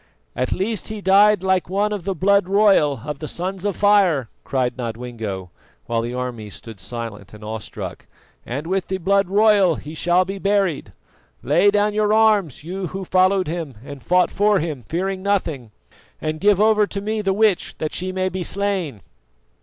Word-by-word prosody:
"At 125 - -1
least 210 +2 -2
he 215 -1 -5
died 200 +1 +4
like 190 -2 +1
one 205 +3 0
of 195 -4 -5
the 195 -1 -1
blood 200 +2 +2
royal 195 - +3
of 150 -2 -5
the 155 - -5
Sons 185 +4 -4
of 205 - 0
Fire!" 190 - +3
cried 125 -2 -1
Nodwengo, 115 -6 -5 0.3
while 115 -1 -1
the 120 +1 -4
armies 120 -5 -5
stood 110 -4 -11
silent 105 -2 -7
and 105 - -13
awestruck, 110 0 -7 0.4
"and 140 +6 -5
with 190 +1 -1
the 190 - -2
blood 195 +1 +1
royal 200 -4 +4
he 150 +2 -9
shall 175 +3 +2
be 195 +1 -5
buried. 195 - 0 0.5
Lay 205 - +4
down 205 +1 +2
your 210 0 +2
arms, 210 - +3
you 185 +3 -4
who 190 +2 -6
followed 185 +1 +3
him 160 -5 -4
and 140 -2 -9
fought 180 +5 +2
for 205 +1 +3
him, 155 -6 -3
fearing 185 - -3
nothing, 165 - -1 0.5
and 155 0 -3
give 205 +1 +3
over 215 -1 +4
to 200 - -5
me 215 +2 -2
the 195 -2 0
witch 205 -1 +1
that 155 -1 -3
she 185 +1 -3
may 185 0 -1
be 185 0 -4
slain." 185 - -2
185 Hz, 180 wpm, -21 LUFS, 140-200 Hz, 0.5 s, died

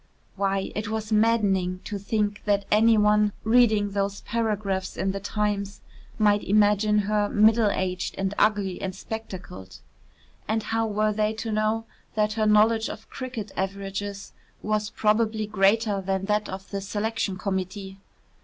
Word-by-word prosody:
Why, 195 0 -1
it 210 0 -3
was 220 0 -4
maddening 205 -5 +2
to 205 - -5
think 205 0 -1
that 200 -1 +1
any 220 +1 +5
one 210 0 +3
reading 220 -3 +3
those 200 0 -2
paragraphs 210 -4 -2
in 190 - 0
the 195 - -4
"Times" 205 0 -2 0.4
might 205 -1 +3
imagine 210 +1 +3
her 210 0 +1
middle 215 +1 +4
aged 185 -2 -2
and 195 0 -1
ugly 205 -4 +1
and 190 -1 -4
spectacled. 190 - -8 0.7
And 220 0 0
how 225 +1 0
were 215 0 +1
they 215 +1 0
to 220 +1 -4
know 215 +1 0 0.3
that 210 0 +1
her 215 0 +1
knowledge 220 +1 +4
of 220 - -9
cricket 245 -6 -6
averages 195 +1 -4 0.3
was 215 0 0
probably 215 0 +1
greater 205 0 +2
than 190 0 -2
that 210 +1 0
of 190 +1 -8
the 200 -1 -3
Selection 205 -1 -2
Committee? 190 0 -4
210 Hz, 145 wpm, -25 LUFS, 195-215 Hz, 0.7 s, any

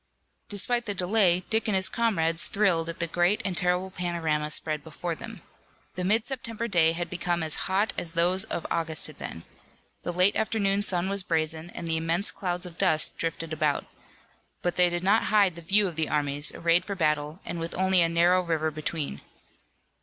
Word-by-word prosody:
Despite 235 +3 0
the 205 - -2
delay, 185 -1 +2
Dick 220 +1 +1
and 210 - +1
his 190 0 +4
comrades, 165 -8 +1
thrilled 175 -6 +1
at 165 - -5
the 170 - -1
great 175 +4 +1
and 190 -2 -2
terrible 180 +1 0
panorama 165 -4 -1
spread 150 -1 +2
before 165 +2 -5
them. - - -9 0.5
The 180 - -4
mid 215 +5 +1
September 235 -4 -4
day 165 -6 +3
had 175 +1 -3
become 175 -1 -2
as 155 +3 -1
hot 200 +3 +1
as 165 -1 -6
those 180 +2 +2
of - - -5
August 160 -2 +1
had 155 - -3
been. 80 - -7 0.6
The - - -3
late 180 +3 +3
afternoon 205 -2 0
sun 185 -3 +1
was 200 0 +2
brazen, 160 -1 -1
and 170 -1 -7
immense 165 +4 +1
clouds 180 -2 -3
of 175 -1 -11
dust 160 -5 +3
drifted 165 -1 -4
about. 155 -2 0 0.8
But 175 - -1
they 180 -1 +5
did 175 0 -3
not 205 +4 +3
hide 205 -4 +3
the 170 - -10
view 200 +5 +3
of 175 - -7
the 160 - 0
armies, 145 0 +2
arrayed 170 +1 +2
for 200 - -5
battle, 150 -1 -1
and 170 - -5
with 165 +1 -5
only 190 -1 +3
a 165 - +2
narrow 175 +2 +3
river 160 -3 -1
between. 155 - -4
175 Hz, 190 wpm, -26 LUFS, 160-190 Hz, 0.8 s, they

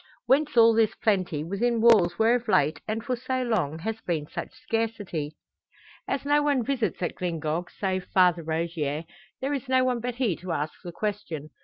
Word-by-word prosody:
Whence 285 -1 +2
all 230 0 +8
this 220 -1 +2
plenty, 185 -8 0
within 225 +7 0
walls 215 -7 +5
where 225 +2 +4
of 245 -1 -1
late 150 -6 +2
and 220 +1 -2
for 255 -2 0
so 255 +1 -2
long, 210 - 0
has 220 +6 -4
been 160 -4 -2
such - - -6
scarcity? 225 - -3 0.7
As 275 - -2
no 290 +1 +4
one 285 -4 +2
visits 255 -8 -1
at 175 - -1
Glyngog 165 -1 -2
save 185 -2 -2
Father 180 -2 +3
Rogier, 160 -2 -2 0.4
there 275 +2 -1
is 275 -2 -4
no 260 0 +4
one 250 -2 +1
but 245 +1 -3
he 240 -8 +1
to 180 -1 -4
ask 155 0 -2
the 175 - -6
question. 170 -6 -4
210 Hz, 185 wpm, -26 LUFS, 170-245 Hz, 0.7 s, all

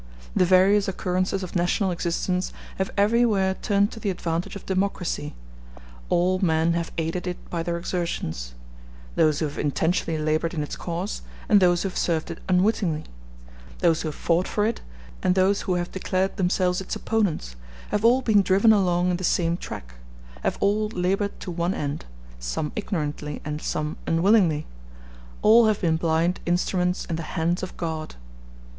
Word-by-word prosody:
The 185 - +4
various 195 +3 +5
occurrences 185 0 -1
of 185 - -7
national 180 +2 +1
existence 180 +1 -1 0.3
have 190 - 0
everywhere 205 -2 +3
turned 200 0 +2
to - - -8
the 210 - -1
advantage 170 -1 -2
of 200 - -8
democracy; 185 -5 -2 0.7
all 185 +2 +2
men 165 -2 +2
have 170 -1 -2
aided 165 +3 -2
it 180 - -3
by 170 - -1
their 170 +1 -2
exertions: 80 - -3 0.6
those 155 -2 +3
who 160 - 0
have 145 - -7
intentionally 160 +2 0
labored 155 +2 0
in 150 - -1
its 150 - -5
cause, 180 +4 -4 0.3
and 205 - +6
those 175 -2 +3
who 195 - -1
have - - -4
served 165 -1 0
it 165 - -7
unwittingly; 180 -4 +2 0.7
those 165 -2 +2
who - - -3
have 150 - -4
fought 170 +2 +1
for 210 - 0
it 225 +1 -1 0.4
and 180 - +2
those 195 +2 +3
who 185 - -1
have 175 0 -2
declared 190 0 -1
themselves 180 -1 +1
its 190 - -4
opponents, 190 - -1 0.3
have 210 0 -1
all 250 +3 +5
been 215 -4 +5
driven 195 +4 +5
along 180 -3 +2
in 175 - 0
the 185 - -7
same 170 -1 +2
track, - - -8 0.5
have - - -1
all 210 +2 +2
labored 195 0 -1
to 180 - -5
one 175 +2 -1
end, 145 +1 -3 0.3
some - - -3
ignorantly 150 -7 -3
and 150 0 -4
some 155 0 -2
unwillingly; 165 -3 +3 0.8
all 225 +1 +7
have 215 -1 +2
been 165 -3 +2
blind 165 +2 +1
instruments 180 +1 0
in 165 - -3
the - - -3 0.2
hands 170 +2 +1
of 185 - -6
God. 160 -2 -4
180 Hz, 170 wpm, -25 LUFS, 165-195 Hz, 0.8 s, all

